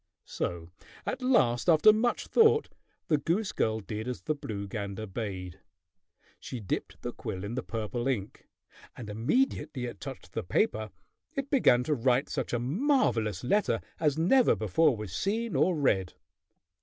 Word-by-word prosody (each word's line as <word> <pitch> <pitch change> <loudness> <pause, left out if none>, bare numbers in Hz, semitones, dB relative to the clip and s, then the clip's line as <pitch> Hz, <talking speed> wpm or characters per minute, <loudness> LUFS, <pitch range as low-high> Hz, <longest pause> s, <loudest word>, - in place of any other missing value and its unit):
So 85 -1 -4 0.3
at 260 - -3
last, 175 - +3
after 170 +6 +7
much 235 +3 0
thought, 450 -1 +4 0.4
the 150 -2 +2
goose 185 +8 0
girl 110 0 0
did 105 +3 -5
as 125 - -5
the 155 - 0
blue 105 -8 -5
gander 100 +1 -5
bade. 95 -4 -5 0.8
She 125 - -6
dipped 100 -5 -4
the - - -4
quill 95 0 -5
in 100 +3 -4
the 130 - -2
purple 115 +2 -3
ink, 110 -7 -3 0.5
and 110 -4 -7
immediately 145 - 0
it 120 -5 -7
touched - - -8
the - - -2
paper 110 0 0 0.5
it 275 0 -3
began 125 - +4
to 150 - 0
write 130 +1 +2
such - - -3
a 120 - +1
marvelous 125 - +1
letter 205 +12 +2 0.2
as 150 -2 +1
never 235 +10 +4
before 115 - +2
was 105 -4 -6
seen 225 +3 -1
or 180 - +3
read! 100 - +1
125 Hz, 155 wpm, -29 LUFS, 105-180 Hz, 0.8 s, after